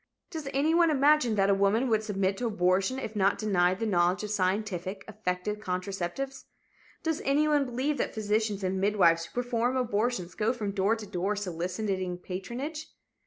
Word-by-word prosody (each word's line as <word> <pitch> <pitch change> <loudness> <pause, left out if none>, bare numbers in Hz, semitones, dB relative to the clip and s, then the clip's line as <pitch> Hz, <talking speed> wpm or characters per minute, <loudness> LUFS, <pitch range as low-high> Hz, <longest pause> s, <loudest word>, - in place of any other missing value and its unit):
Does 315 -5 -5
anyone 320 +5 +3
imagine 290 -5 +4
that 195 -1 +3
a - - +5
woman 200 +6 +2
would 220 -3 +2
submit 195 -3 0
to 245 - -1
abortion 190 +3 +1
if 220 -4 -5
not 195 -1 +2
denied 185 -4 +2
the 225 - -1
knowledge 180 -1 +2
of 210 - -4
scientific, 190 -1 -1
effective 210 -1 -3
contraceptives? 190 +7 -4 0.6
Does 320 -2 -1
anyone 290 +1 +3
believe 260 +5 -1
that - - -2
physicians 210 -1 0
and 190 0 -1
midwives 180 -5 +3
who 165 - -15
perform 245 +1 0
abortions 225 -6 -1
go 220 +3 0
from 210 -5 -3
door 200 +3 +2
to 220 -2 -8
door 195 +1 -1
soliciting 185 0 -3
patronage? 240 - -5
210 Hz, 165 wpm, -29 LUFS, 185-245 Hz, 0.6 s, a